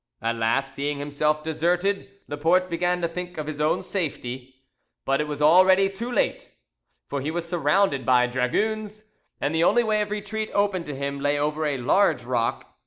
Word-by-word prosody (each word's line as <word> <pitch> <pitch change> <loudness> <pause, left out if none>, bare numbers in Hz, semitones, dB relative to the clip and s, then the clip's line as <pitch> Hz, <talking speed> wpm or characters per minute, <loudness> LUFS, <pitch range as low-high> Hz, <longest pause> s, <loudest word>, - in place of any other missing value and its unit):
At 115 +1 -2
last, 130 +5 0
seeing 145 +1 -2
himself 150 +2 -1
deserted, 175 +6 0 0.2
Laporte 170 +5 +1
began 175 +1 0
to - - +3
think 180 +1 -7
of 155 - -3
his 150 -1 -5
own 155 +4 +1
safety. 130 -9 -4 0.5
But 135 +2 +1
it 150 - -3
was 150 0 -3
already 185 +4 +6
too 230 +6 -6
late, - - -1 0.6
for 140 - -3
he 145 - -3
was 170 +1 -3
surrounded 165 -3 +1
by 125 -1 +4
dragoons, 210 - -1 0.4
and 145 - -1
the 160 +1 +2
only 240 +7 +4
way 215 -1 +1
of 210 - -2
retreat 210 +1 -4
open 200 -3 +1
to 145 - -6
him 140 +1 -4
lay 145 +1 +1
over 150 +1 -1
a 145 -2 -1
large 130 +3 +2
rock. 120 -1 -2
155 Hz, 180 wpm, -24 LUFS, 140-190 Hz, 0.6 s, already